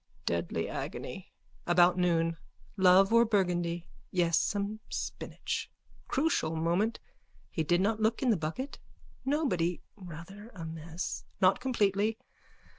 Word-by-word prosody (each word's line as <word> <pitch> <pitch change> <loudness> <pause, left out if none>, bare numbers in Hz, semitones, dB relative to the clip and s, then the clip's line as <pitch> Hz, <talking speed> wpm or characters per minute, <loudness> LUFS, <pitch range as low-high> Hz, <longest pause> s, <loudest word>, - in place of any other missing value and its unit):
Deadly 85 0 -1
agony. - - -6 0.4
About 175 0 +5
noon. 165 -2 +2 0.4
Love 190 +1 +6
or 230 0 +7
burgundy. 175 -5 0 0.2
Yes, 170 -2 +2
some 205 +1 -1
spinach. - - -4 0.4
Crucial 270 - +1
moment. 175 +8 +1 0.5
He 160 - -1
did 175 +3 +2
not 215 +2 +1
look 225 +4 +1
in 250 - +4
the - - +4
bucket. 185 - -4 0.5
Nobody. 185 - +1 0.2
Rather 195 +3 -10
a 165 -3 -6
mess. 160 +2 -5 0.2
Not 185 +1 +5
completely. 215 -4 +1
185 Hz, 115 wpm, -31 LUFS, 170-215 Hz, 0.5 s, or